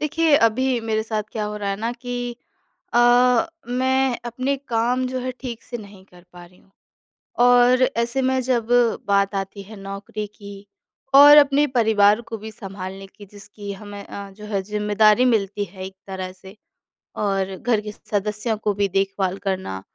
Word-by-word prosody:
देखिए, 315 0 +2
अभी 250 +1 +2
मेरे 220 -1 -1
साथ 220 -1 -2
क्या 215 -2 -2
हो 210 0 -4
रहा 200 -1 -3
है 195 - -2
ना 225 +3 -3
कि 245 0 -5 0.6
अ, 240 0 +5 0.2
मैं 260 0 +1
अपने 255 +4 -2
काम 240 +2 +1
जो 255 0 -3
है 255 +1 -3
ठीक 240 -3 -6
से 240 - -7
नहीं 200 -3 -13
कर 180 -2 -19
पा 175 0 -12
रही 180 +1 -22
हूँ - - -27 0.8
और 245 +1 +5 0.2
ऐसे 235 +3 +1
में 260 0 +1
जब 245 -3 0 0.4
बात 200 0 +2
आती 195 +1 -4
है 215 +3 -12
नौकरी 195 +2 -6
की 200 -1 -12 0.6
और 290 +1 +10
अपने 285 0 +5
परिवार 220 -4 +3
को 225 - -4
भी 220 +1 -9
सँभालने 195 -1 -8
की 205 +1 -15
जिसकी 205 0 -9
हमें 205 0 -9
अ, 200 0 -8
जो 210 +2 -12
है 200 -2 -2
ज़िम्मेदारी 210 +3 +3
मिलती 205 -4 +1
है 185 0 -9
एक 190 0 -10
तरह 190 -1 -5
से 190 +1 -14 0.6
और 195 -2 -1
घर 225 -1 0
के 210 0 -7
सदस्यों 210 +2 -3
को 210 -1 -1
भी 200 0 0
देखभाल 195 -1 -1
करना 185 - -3
215 Hz, 175 wpm, -22 LUFS, 200-245 Hz, 0.8 s, और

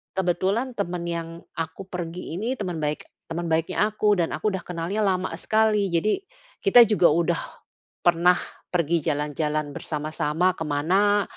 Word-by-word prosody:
kebetulan 190 +7 0
temen 180 -3 -2
yang 170 -1 -3 0.3
aku 165 +3 -4
pergi 175 -2 -5
ini 235 +7 -1
teman 180 -8 -4
baik 150 0 -2 0.2
teman 165 0 -3
baiknya 185 +6 +1
aku 210 -1 +2
dan 170 -3 0
aku - - -2
udah 185 - -5
kenalnya 180 +5 -2
lama 185 -1 +1
sekali, 210 0 +2
jadi 210 - +1 0.4
kita 245 - +8
juga 200 -5 +4
udah 170 +1 +1 0.6
pernah 175 +1 +5 0.3
pergi 170 -1 +1
jalan-jalan 150 0 -1
bersama-sama 155 +4 -1
ke 160 -3 -5
mana 195 +8 +2
175 Hz, 145 wpm, -25 LUFS, 165-200 Hz, 0.6 s, kita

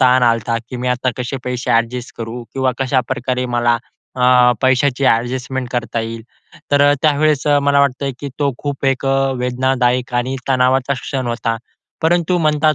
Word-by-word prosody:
ताण 130 0 +5
आलता, 115 -1 +2
की 125 - -5
मी 125 +1 -2
आता 125 +1 0
कसे 125 +2 -3
पैसे 125 0 -3
ॲडजस्ट 115 +2 0
करू? 115 +1 -5
किंवा 130 -1 +1
कशाप्रकारे 125 -1 -1
मला 120 0 +3 0.4
अ, 125 -1 +5
पैशाची 130 +1 +2
ॲडजस्टमेंट 125 +2 0
करता 120 -1 -2
येईल. 115 0 -5 0.5
तर 145 - +4
अ, - - +5
त्यावेळेस 150 -1 +2
अ, 145 -1 +4
मला 140 0 +3
वाटतंय, 140 0 0
की 145 - -4
तो 140 -2 +1
खूप 140 -1 -4
एक 135 0 0
अ, 135 0 +2
वेदनादायक 125 0 0
आणि 125 +2 -1
तणावाचा 130 +1 +2
क्षण 130 -1 -3
होता. 115 -1 -1 0.5
परंतु 175 +2 +2
म्हणतात 155 -1 +2
130 Hz, 165 wpm, -18 LUFS, 125-140 Hz, 0.5 s, ताण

